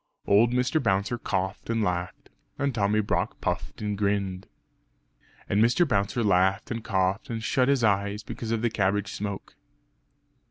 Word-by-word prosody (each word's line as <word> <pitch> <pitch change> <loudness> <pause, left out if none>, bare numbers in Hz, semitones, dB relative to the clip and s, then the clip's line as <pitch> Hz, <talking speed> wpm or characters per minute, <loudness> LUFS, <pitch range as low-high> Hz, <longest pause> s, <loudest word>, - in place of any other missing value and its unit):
Old 110 +4 +4
Mr. 125 +5 +1
Bouncer 100 +1 0
coughed 95 0 -3
and 115 -1 +1
laughed; 90 -2 -3 0.3
and 140 -1 0
Tommy 105 -1 +2
Brock 100 0 -2
puffed 80 0 -3
and 105 -1 -1
grinned. 100 -2 -1 1.0
And 105 +3 +3
Mr. 125 +9 +3
Bouncer 105 0 0
laughed 95 +1 +2
and 115 -2 -3
coughed, 95 0 0
and 115 -2 -4
shut 125 +3 +2
his 140 -3 +2
eyes 100 0 +1
because 110 +1 -6
of 115 0 -1
the 120 - +1
cabbage 100 -1 0
smoke.... 100 -1 -5
105 Hz, 155 wpm, -26 LUFS, 95-115 Hz, 1.0 s, Old